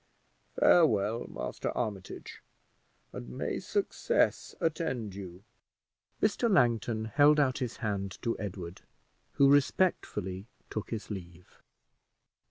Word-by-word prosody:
Farewell, 115 Hz, -, +4 dB
Master -, -, -4 dB
Armitage, 105 Hz, -6 st, -5 dB, 0.7 s
and -, -, -7 dB
may 60 Hz, -, -3 dB
success -, -, 0 dB
attend 140 Hz, -, -1 dB
you!" 95 Hz, -1 st, -9 dB, 0.8 s
Mr. 215 Hz, +3 st, +2 dB
Langton 115 Hz, -, +2 dB
held 145 Hz, +5 st, +5 dB
out 130 Hz, -2 st, +2 dB
his 125 Hz, -4 st, -3 dB
hand 100 Hz, -2 st, -2 dB
to 115 Hz, -1 st, 0 dB
Edward, 90 Hz, -4 st, -6 dB, 0.5 s
who 140 Hz, -, +5 dB
respectfully 115 Hz, -, +1 dB, 0.2 s
took 110 Hz, -, -4 dB
his 110 Hz, -1 st, -5 dB
leave. 90 Hz, -3 st, -9 dB
110 Hz, 100 wpm, -30 LUFS, 95-140 Hz, 0.8 s, held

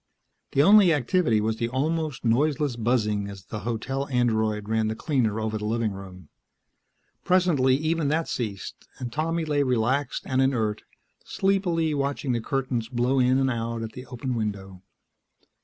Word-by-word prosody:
The 140 Hz, -, +4 dB
only 200 Hz, 0 st, +7 dB
activity 145 Hz, -4 st, +2 dB
was 110 Hz, +1 st, -1 dB
the 115 Hz, 0 st, -1 dB
almost 150 Hz, +1 st, -2 dB
noiseless 140 Hz, +3 st, +1 dB
buzzing 105 Hz, -4 st, 0 dB
as 100 Hz, -2 st, -10 dB
the 105 Hz, -, -6 dB
hotel 120 Hz, +5 st, -3 dB
android 110 Hz, -5 st, 0 dB
ran 110 Hz, 0 st, +1 dB
the 110 Hz, -, -2 dB
cleaner 115 Hz, -5 st, 0 dB
over 110 Hz, 0 st, -2 dB
the 105 Hz, -, -4 dB
living 115 Hz, 0 st, 0 dB
room. 95 Hz, -4 st, -10 dB, 0.9 s
Presently 165 Hz, -8 st, +3 dB
even 155 Hz, +1 st, 0 dB
that 160 Hz, +3 st, 0 dB
ceased, 105 Hz, -6 st, -5 dB
and 120 Hz, -2 st, -6 dB
Tommy 165 Hz, +2 st, -1 dB
lay 145 Hz, -2 st, +1 dB
relaxed 130 Hz, +1 st, 0 dB
and 130 Hz, 0 st, +1 dB
inert, 115 Hz, -6 st, 0 dB, 0.4 s
sleepily 175 Hz, -5 st, 0 dB
watching 140 Hz, -1 st, -1 dB
the 120 Hz, -1 st, 0 dB
curtains 125 Hz, -3 st, -2 dB
blow 125 Hz, +2 st, +1 dB
in 130 Hz, +1 st, +3 dB
and 135 Hz, -1 st, +2 dB
out 115 Hz, -1 st, -3 dB
at 110 Hz, -, -5 dB
the 125 Hz, +2 st, -10 dB
open 125 Hz, +1 st, -4 dB
window. 100 Hz, -5 st, -4 dB
125 Hz, 155 wpm, -25 LUFS, 110-145 Hz, 0.9 s, only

